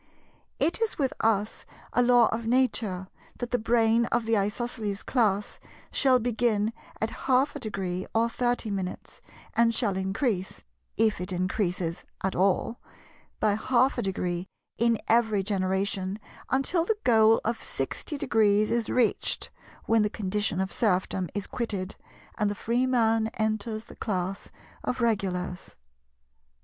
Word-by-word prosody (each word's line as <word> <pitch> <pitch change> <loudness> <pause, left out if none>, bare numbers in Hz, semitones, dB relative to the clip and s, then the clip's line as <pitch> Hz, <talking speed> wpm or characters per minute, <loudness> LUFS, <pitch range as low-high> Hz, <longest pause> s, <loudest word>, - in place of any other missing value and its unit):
It 340 +7 +1
is 450 - 0
with 270 -3 0
us 215 -1 0 0.3
a 245 - +4
Law 245 -1 +6
of 225 0 -3
Nature 225 -7 +1 0.3
that 245 -1 -5
the 245 - +2
brain 230 0 +3
of 240 -1 0
the 225 0 +2
Isosceles 210 0 -2
class 210 -5 0 0.3
shall 265 -2 +4
begin 230 -2 +1 0.3
at 220 +1 -1 0.2
half 260 +3 +3
a - - -4
degree, 185 -4 -3
or 230 +1 +4
thirty 240 -2 -1
minutes, 190 -2 -5 0.3
and 230 0 +4
shall 205 -6 +1
increase 190 +1 -2 0.3
(if 220 -4 +2
it 180 - -4
increases 180 -2 -1 0.2
at 190 - 0
all) 195 +5 +1 0.6
by 215 -2 +3
half 250 +5 +2
a - - +1
degree 180 -2 -2 0.3
in 235 0 +3
every 220 -3 +3
generation 190 0 -1 0.3
until 275 +6 +2
the 425 +5 0
goal 225 -2 +5
of 230 +1 0
60° 225 -9 0
is 235 -2 0
reached, 240 -4 +1 0.3
when 225 0 +3
the 210 - +2
condition 205 -2 -1
of 190 0 -1
serfdom 190 -4 +1
is 205 -1 -2
quitted, 205 -5 -3 0.4
and 210 -2 +2
the 205 - -3
freeman 230 -1 +2
enters 220 0 -2
the - - -13
class 190 -1 -3 0.3
of 250 - -2
Regulars. 185 - -1
220 Hz, 135 wpm, -27 LUFS, 195-235 Hz, 0.6 s, Law